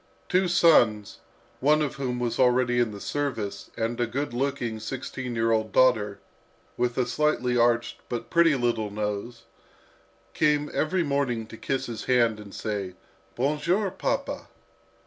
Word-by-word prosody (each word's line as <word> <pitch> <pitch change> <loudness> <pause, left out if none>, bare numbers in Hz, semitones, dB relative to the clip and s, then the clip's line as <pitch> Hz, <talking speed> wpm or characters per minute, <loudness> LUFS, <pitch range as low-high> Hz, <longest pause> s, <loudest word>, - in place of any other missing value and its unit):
Two 185 0 +3
sons, 120 - +4 0.4
one 150 +3 +4
of 140 -3 -3
whom 125 -3 -2
was 120 -1 -2
already 125 -1 +3
in 120 -2 +2
the 105 -1 -8
service, 125 -6 -3
and 115 +2 -1
a 120 - +1
good 135 +2 -3
looking, 125 -3 -2
sixteen 125 +1 -5
year 115 0 +1
old 110 -1 +1
daughter, 105 -6 +3 0.6
with 120 0 -1
a 130 - +2
slightly 125 -3 0
arched 120 0 +2
but 120 -1 -5
pretty 165 -3 +5
little 120 -4 0
nose, 105 +3 -4 0.9
came 150 -1 +1
every 175 +3 +1
morning 140 -6 -1
to 115 - -11
kiss 135 +3 -2
his 115 -3 -6
hand 115 -4 +2
and 100 -2 -11
say, 100 -4 -4 0.4
"Bon 140 +5 0
jour, 185 +6 +1
papa." 275 +9 -3
120 Hz, 150 wpm, -26 LUFS, 115-140 Hz, 0.9 s, pretty